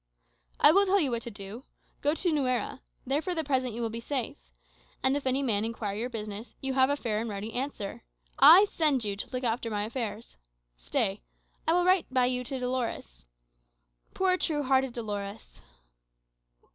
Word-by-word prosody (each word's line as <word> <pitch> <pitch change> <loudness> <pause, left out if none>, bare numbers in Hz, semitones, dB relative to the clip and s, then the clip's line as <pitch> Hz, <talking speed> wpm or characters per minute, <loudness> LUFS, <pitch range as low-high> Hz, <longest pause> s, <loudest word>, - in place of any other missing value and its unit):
"I - - +8
will 395 +3 +4
tell 395 +1 +4
you 285 -7 +1
what 235 -1 -2
to 235 - -6
do. 205 +3 -9 0.4
Go 295 +2 +2
to 350 +1 +1
Nuera. 260 -4 -1 0.2
There 275 +4 0
for 360 +1 -2
the 320 - +1
present 260 -5 -1
you 235 - -3
will 225 - -2
be 230 - -4
safe. 230 - -4 0.5
And 265 +1 +3
if 285 -2 -2
any 265 +2 +2
man 215 -5 +2
inquire 220 -3 -3
your 235 +4 -3
business, 215 -1 -6
you 270 0 -2
have 260 0 +4
a 285 - +2
fair 220 -6 -2
and 230 +1 -3
ready 210 +2 -5
answer. 245 -6 -4 0.4
I 385 +5 +9
send 300 - +1
you 205 -1 -1
to 200 - -4
look 255 0 -4
after 230 0 -1
my 205 -1 -1
affairs. 225 -1 -5 0.4
Stay; - - -1 0.5
I 325 - +4
will 355 0 +3
write 370 -6 +3
by 255 -1 +3
you 250 0 0
to 265 +2 -3
Dolores. 240 - -4 0.9
Poor, 375 -1 +3
true 300 -5 0
hearted 265 -1 +2
Dolores!" 205 -2 -6
250 Hz, 185 wpm, -28 LUFS, 220-280 Hz, 0.9 s, I